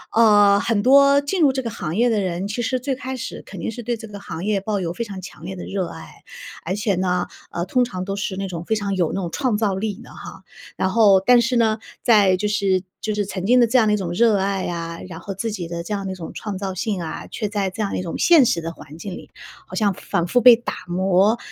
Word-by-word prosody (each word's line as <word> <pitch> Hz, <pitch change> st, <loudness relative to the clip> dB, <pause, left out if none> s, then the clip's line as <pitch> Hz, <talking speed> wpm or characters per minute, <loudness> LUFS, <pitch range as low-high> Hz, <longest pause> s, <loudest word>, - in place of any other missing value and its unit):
呃， 205 Hz, -3 st, +6 dB
很 215 Hz, -2 st, 0 dB
多 280 Hz, +2 st, +6 dB
进 355 Hz, +6 st, -2 dB
入 275 Hz, -, +5 dB
这 265 Hz, -, -1 dB
个 235 Hz, -, -4 dB
行 175 Hz, -5 st, -5 dB
业 240 Hz, +2 st, +3 dB
的 220 Hz, -, +1 dB
人， 185 Hz, 0 st, -2 dB
其 210 Hz, +4 st, -3 dB
实 255 Hz, +3 st, 0 dB
最 265 Hz, +2 st, -2 dB
开 260 Hz, 0 st, -5 dB
始 245 Hz, -, -6 dB
肯 -, -, -9 dB
定 -, -, -3 dB
是 240 Hz, +2 st, -8 dB
对 240 Hz, +1 st, -1 dB
这 225 Hz, 0 st, -10 dB
个 205 Hz, -, -8 dB
行 170 Hz, -3 st, -7 dB
业 205 Hz, -1 st, +1 dB
抱 205 Hz, 0 st, -2 dB
有 165 Hz, -, -2 dB
非 235 Hz, -, -3 dB
常 195 Hz, -3 st, -8 dB
强 165 Hz, -3 st, -11 dB
烈 190 Hz, -, -5 dB
的 180 Hz, -, -7 dB
热 195 Hz, -2 st, -2 dB
爱， -, -, -12 dB, 0.4 s
而 185 Hz, -, -1 dB
且 205 Hz, -2 st, 0 dB
呢， 180 Hz, -1 st, 0 dB, 0.2 s
呃， 170 Hz, +1 st, -3 dB
通 250 Hz, +5 st, +2 dB
常 185 Hz, -5 st, -5 dB
都 195 Hz, +1 st, -3 dB
是 200 Hz, -2 st, -3 dB
那 195 Hz, 0 st, -3 dB
种 170 Hz, -2 st, -6 dB
非 220 Hz, -, 0 dB
常 200 Hz, -2 st, -2 dB
有 175 Hz, -4 st, +1 dB
那 195 Hz, -, -2 dB
种 170 Hz, -, -3 dB
创 255 Hz, -6 st, 0 dB
造 210 Hz, -3 st, +1 dB
力 210 Hz, +2 st, -3 dB
的 -, -, -15 dB
哈。 -, -, -11 dB, 0.3 s
然 190 Hz, -, 0 dB
后， 200 Hz, -2 st, +5 dB
但 245 Hz, +4 st, +5 dB
是 235 Hz, +1 st, +1 dB
呢， 220 Hz, -2 st, +3 dB, 0.3 s
在 205 Hz, -5 st, +5 dB
就 210 Hz, +3 st, -1 dB
是 195 Hz, -3 st, +1 dB, 0.2 s
就 215 Hz, -, -2 dB
是 205 Hz, -, 0 dB
曾 190 Hz, -2 st, -4 dB
经 250 Hz, +3 st, +5 dB
的 235 Hz, -, +5 dB
这 255 Hz, -, +3 dB
样 220 Hz, -3 st, +4 dB
的 210 Hz, -, +3 dB
一 -, -, +2 dB
种 185 Hz, -4 st, -4 dB
热 220 Hz, +4 st, +3 dB
爱 195 Hz, 0 st, -1 dB
啊， 170 Hz, -1 st, -4 dB
然 185 Hz, -, -8 dB
后 200 Hz, -, -5 dB
自 225 Hz, +4 st, -3 dB
己 180 Hz, -5 st, -5 dB
的 170 Hz, 0 st, -4 dB
这 210 Hz, -, -5 dB
样 200 Hz, -1 st, -3 dB
的 -, -, -3 dB
一 -, -, -8 dB
种 170 Hz, -3 st, -8 dB
创 205 Hz, -3 st, -5 dB
造 190 Hz, -1 st, -4 dB
性 200 Hz, 0 st, -2 dB
啊， 160 Hz, -, -6 dB
却 215 Hz, -, -4 dB
在 205 Hz, -2 st, -1 dB
这 185 Hz, +4 st, -6 dB
样 200 Hz, -, -2 dB
一 -, -, -2 dB
种 170 Hz, -, -5 dB
现 335 Hz, -6 st, +6 dB
实 170 Hz, -, +1 dB
的 165 Hz, 0 st, -5 dB
环 155 Hz, 0 st, -13 dB
境 190 Hz, +3 st, -7 dB
里， -, -, -10 dB, 0.4 s
好 -, -, -8 dB
像 205 Hz, -3 st, +2 dB
反 170 Hz, -1 st, -2 dB
复 245 Hz, +7 st, +2 dB
被 240 Hz, 0 st, +9 dB
打 235 Hz, -, -5 dB
磨， 190 Hz, +5 st, +2 dB
200 Hz, 300 characters per minute, -21 LUFS, 185-230 Hz, 0.4 s, 被